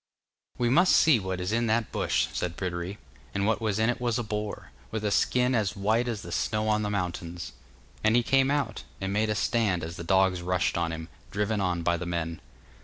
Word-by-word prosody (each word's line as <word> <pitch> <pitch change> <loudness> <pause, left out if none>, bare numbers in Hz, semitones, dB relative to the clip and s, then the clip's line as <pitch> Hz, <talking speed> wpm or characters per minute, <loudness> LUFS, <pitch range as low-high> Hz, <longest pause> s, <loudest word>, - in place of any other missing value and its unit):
'We 120 -1 +1
must 175 +8 +5
see 155 -7 +6
what 95 -2 -3
is 90 +2 -2
in 115 +1 +1
that 110 0 +1
bush,' - - +1
said 85 -1 -3
Pryderi, 90 +1 -3 0.4
and 100 0 +1
what 110 +2 +1
was 110 -2 0
in 110 0 +2
it 120 - -1
was 120 -1 +1
a 120 - -1
boar, 105 - -4 0.2
with 110 -1 -3
a 105 - +1
skin 125 +4 +2
as 105 -6 +1
white 110 +5 +1
as 115 -4 -3
the 85 - -8
snow 105 +5 0
on 105 0 +2
the 105 - -1
mountains. 90 -3 -3 0.5
And 110 +1 +4
he 120 - +4
came 135 +2 +3
out, 140 -7 -1 0.2
and 95 0 -2
made 110 +1 +1
a 105 - +1
stand 105 -5 +1
as 80 +2 -6
the - - -5
dogs 95 0 +3
rushed 90 0 0
on 85 -1 0
him, 80 0 -5 0.2
driven 105 +1 -1
on 90 -3 0
by 85 0 +2
the 90 +1 -5
men. 85 -1 -3
105 Hz, 225 wpm, -28 LUFS, 90-115 Hz, 0.5 s, see